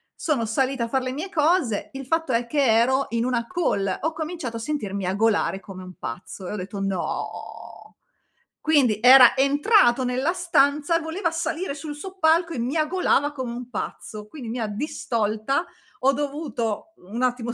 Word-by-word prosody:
Sono 270 -8 -1
salita 255 +2 0
a - - -6
far 265 +2 0
le 255 - -2
mie 315 +8 -5
cose. 310 - +1
Il 270 -1 -8
fatto 325 -1 0
è 235 0 0
che 285 +2 +1
ero 250 +4 +3
in 230 0 0
una 240 -2 0
call, 200 - -1
ho 320 - 0
cominciato 315 -7 -5
a - - -5
sentir 230 -5 -3
miagolare 200 +1 +1
come 190 -1 -10
un 185 0 -10
pazzo 180 - -7
e - - -4
ho - - -3
detto: 195 +1 -6
"No." 195 -2 -5 0.6
Quindi 270 -9 +3
era 250 0 +9
entrato 280 - +4
nella 255 +6 0
stanza, 320 -3 +2
voleva 330 +2 -2
salire 330 0 -2
sul 295 0 -6
soppalco 335 0 +1
e 255 - -4
miagolava 300 +3 +1
come 260 -4 -4
un 245 +1 -7
pazzo, 210 -2 -6
quindi 250 +2 -9
mi 240 +2 -3
ha 225 - -1
distolta 220 +3 -1 0.4
ho 270 - +7
dovuto 275 -6 -3
un 205 +7 -7
attimo 245 -2 -1
260 Hz, 170 wpm, -24 LUFS, 225-310 Hz, 0.6 s, era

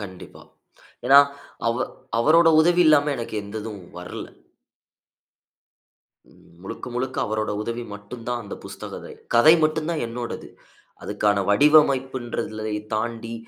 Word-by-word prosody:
கண்டிப்பா. 95 -3 -10 0.6
ஏனா, 140 +2 +8 0.5
அவ 115 +2 +1 0.3
அவரோட 165 +6 +5
உதவி 175 +2 +4
இல்லாம, 150 -1 +5
எனக்கு 115 -2 -6
எந்ததும் 105 0 -7 0.2
வர்ல. 90 - -7 2.1
ம், - - -22
முழுக்க 95 - -8
முழுக்க 130 +1 -3
அவரோட 110 0 -2
உதவி 115 +2 -4
மட்டுந்தான், 115 +3 -6
அந்த 100 - -7
புஸ்த - - -8
கதை. - - -9 0.2
கதை 155 +8 +7
மட்டுந்தா 155 +2 -1
என்னோடது. 120 +1 -6 0.5
அதுக்கான 105 -1 0
வடிவமைப்புன்றததுளை 130 -5 +2 0.2
தாண்டி, 115 +1 -3
120 Hz, 105 wpm, -23 LUFS, 110-145 Hz, 2.1 s, ஏனா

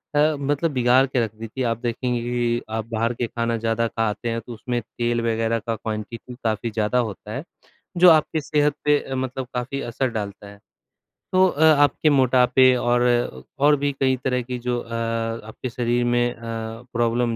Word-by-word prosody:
अ, 150 +1 +4
मतलब 145 +3 0
बिगाड़ 125 0 +4
के 130 -2 0
रख 110 -2 -4
दी 115 +1 -7
थी। 130 +4 -4
आप 115 - -1
देखेंगे 120 +1 -2
कि 120 0 0
आप 110 -1 -2
बाहर 115 +1 0
के 120 - -2
खाना 115 0 -1
ज़्यादा 115 +1 0
खाते 115 +1 -2
हैं 115 0 -1
तो 120 +2 -9
उसमें 120 +2 -3
तेल 120 +1 -2
वगैरह 115 0 0
का 115 +1 -3
क्वांटिटी 110 +3 -6
काफ़ी 110 +1 -1
ज़्यादा 110 +3 +1
होता 105 -2 -4
है। 135 +6 -4 0.5
जो 180 +1 +8
आपकी 155 0 +3
सेहत 145 +1 +1
पे 150 0 +5
अ, 135 - -6
मतलब 130 0 -3
काफ़ी 125 +3 -3
असर 125 +2 -2
डालता 105 -2 -5
है। 100 0 -13 0.7
तो 185 0 +6
अ, 160 -3 0
आपके 150 0 +4
मोटापे 130 -1 +4
और 120 0 +1 0.6
और 145 +1 +5
भी 145 0 0
कई 130 -1 +3
तरह 125 -1 0
की 125 +1 -5
जो 120 0 -1
अ, 115 - -10
आपके 115 +1 -3
शरीर 120 0 0
में 120 0 +2
अ, - - -20 0.5
प्रॉब्लम 120 0 +1
120 Hz, 185 wpm, -23 LUFS, 115-130 Hz, 0.7 s, जो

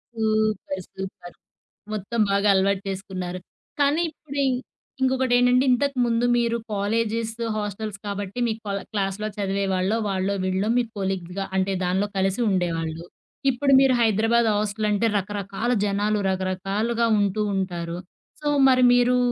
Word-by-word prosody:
Super. 215 -3 0
Super. 190 -2 -8 0.6
మొత్తం 215 +3 -3
బాగా 200 +1 +2
అలవాటు 195 0 +2
చేసుకున్నారు. 185 -2 -5 0.4
కానీ, 290 +4 +3
ఇప్పుడి 285 -3 -5
ఇంక్ 250 0 -2 0.4
ఇంకొకటేంటంటే 255 -1 +3
ఇంతకముందు 245 -3 +1
మీరు 235 0 +1 0.2
కాలేజెస్, 225 +2 0 0.3
హాస్టల్స్ 210 0 -4
కాబట్టి 200 +2 -4
మీ 220 - 0
కొల 200 -1 -2
క్లాస్‌లో 200 0 -2
చదివే‌వాళ్ళో, 195 +1 0
వాళ్ళో 195 0 0
వీళ్ళో 190 +2 0
మీ 245 - +3
కొలీగ్‌గా 190 0 -3
అంటే 190 +1 +1
దానిలో 190 +3 +1
కలిసి 195 +4 +1
ఉండేవాళ్ళు. 165 -3 -1 0.5
ఇప్పుడు 275 +2 +2
మీరు 270 -1 +4
హైదరాబాద్ 225 +2 +3
హాస్టల్ 210 +1 -1
అంటే 205 +3 +1
రకరకాల 200 +3 -3
జనాలు 205 +1 0
రకరకాలుగా 195 +5 -1
ఉంటూ 205 +1 +1
ఉంటారు. 175 -3 -3 0.4
సో, 295 - -3 0.2
మరి 255 -1 +5
మీరు 245 0 +4
205 Hz, 125 wpm, -24 LUFS, 190-235 Hz, 0.6 s, మరి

